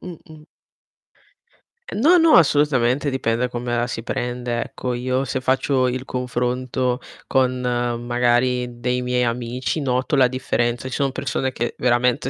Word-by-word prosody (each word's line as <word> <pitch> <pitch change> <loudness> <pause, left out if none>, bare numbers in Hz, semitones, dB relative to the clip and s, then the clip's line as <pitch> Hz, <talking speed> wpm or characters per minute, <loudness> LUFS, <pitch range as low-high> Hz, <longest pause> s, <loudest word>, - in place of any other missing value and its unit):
Mh-mh. 160 -3 -11 1.5
No, 325 +11 +4
no, 325 -1 +6
assolutamente 145 -4 +3
dipende 115 -4 -1
da - - -4
come 120 0 -3
la 120 0 0
si 115 -2 -5
prende, 120 -1 -3
ecco. 125 +2 -4
Io 130 +2 -1
se 130 0 -3
faccio 130 0 +1
il 130 +1 -3
confronto 125 0 -2 0.3
con 130 -1 +1
magari 120 0 0
dei 125 +1 -1
miei 125 0 0
amici, 120 +4 -2
noto 130 +2 0
la 130 -2 +5
differenza. 120 -1 -1
Ci 130 - -6
son 140 +1 0
persone 130 0 -2
che 120 -1 -3
veramente 125 +1 +2
125 Hz, 140 wpm, -21 LUFS, 120-130 Hz, 1.5 s, no